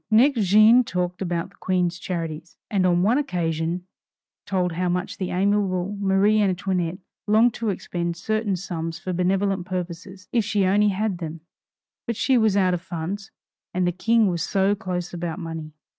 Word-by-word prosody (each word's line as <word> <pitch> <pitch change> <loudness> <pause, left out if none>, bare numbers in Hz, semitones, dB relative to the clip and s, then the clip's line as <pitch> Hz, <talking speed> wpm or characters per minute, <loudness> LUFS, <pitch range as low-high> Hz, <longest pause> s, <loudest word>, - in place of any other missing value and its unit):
Next 235 +3 +4
Jeanne 215 +5 +7
talked 180 -3 -3
about 175 0 -2
the - - -23
Queen's 180 -1 0
charities; 165 -2 -5
and 190 -3 +2
on 175 0 +3
one 235 +8 +3
occasion, 170 - -2 0.6
told 180 -2 0
how 180 +2 -1
much 180 +2 -2
the 185 - -2
amiable 195 0 0
Marie 200 +2 +3
Antoinette 185 -3 0 0.3
longed 220 +3 +4
to 230 -1 -2
expend 175 -3 -3
certain 215 +1 -1
sums 165 -3 -4
for 185 +2 -4
benevolent 185 +1 0
purposes 185 +1 -6
if 235 -2 +2
she 205 -2 +1
only 205 +3 +4
had 200 -2 -1
them 165 -1 -6 0.7
but 235 - -1
she 265 +5 +2
was 220 -4 +3
out 185 -2 +3
of 175 - -2
funds, 180 +4 -5 0.5
and 185 0 +2
the 175 - +2
King 225 +5 +2
was 175 -4 0
so 195 +3 +2
close 180 -4 -4
about 175 0 -4
money! 165 -3 -6
185 Hz, 170 wpm, -24 LUFS, 175-205 Hz, 0.7 s, Jeanne